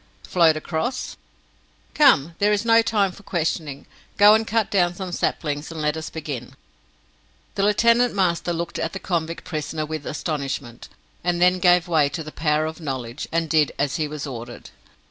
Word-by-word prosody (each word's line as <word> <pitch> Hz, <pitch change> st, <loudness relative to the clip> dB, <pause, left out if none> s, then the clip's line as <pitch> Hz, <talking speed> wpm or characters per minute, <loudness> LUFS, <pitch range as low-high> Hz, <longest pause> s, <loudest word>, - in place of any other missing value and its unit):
"Float 165 Hz, -3 st, +3 dB
across. 160 Hz, +11 st, -3 dB, 0.8 s
Come, 170 Hz, -, +4 dB
there 205 Hz, +1 st, +3 dB
is 210 Hz, +2 st, 0 dB
not 230 Hz, 0 st, +4 dB
time 200 Hz, -4 st, +2 dB
for 190 Hz, -, -14 dB
questioning! 160 Hz, -6 st, -3 dB, 0.3 s
Go 205 Hz, +1 st, +8 dB
and 220 Hz, 0 st, +2 dB
cut 225 Hz, -1 st, 0 dB
down 175 Hz, -3 st, +2 dB
some 185 Hz, -1 st, -6 dB
saplings, 150 Hz, -3 st, -2 dB
and 165 Hz, -, -7 dB
let 150 Hz, 0 st, 0 dB
us 160 Hz, 0 st, -5 dB
begin!" 145 Hz, -7 st, -6 dB, 1.0 s
The -, -, -2 dB
lieutenant 230 Hz, +3 st, +3 dB
master 175 Hz, -3 st, +1 dB
looked 170 Hz, 0 st, -4 dB
at 165 Hz, -, -2 dB
the 195 Hz, -, -5 dB
convict 165 Hz, -3 st, -3 dB
prisoner 155 Hz, -1 st, -4 dB
with 155 Hz, -1 st, -6 dB
astonishment, 140 Hz, -6 st, -4 dB, 0.3 s
and 175 Hz, 0 st, 0 dB
then 180 Hz, +1 st, +4 dB
gave 180 Hz, -1 st, +4 dB
way 155 Hz, -4 st, +3 dB
to 160 Hz, +2 st, -5 dB
the 155 Hz, -, -9 dB
power 150 Hz, 0 st, 0 dB
of 160 Hz, +2 st, -6 dB
knowledge, 130 Hz, -3 st, -5 dB
and 165 Hz, 0 st, 0 dB
did 155 Hz, -2 st, +2 dB
as 140 Hz, -1 st, -1 dB
he 155 Hz, -, -1 dB
was 150 Hz, -1 st, -6 dB
ordered. 120 Hz, -3 st, -8 dB
165 Hz, 175 wpm, -23 LUFS, 150-185 Hz, 1.0 s, Go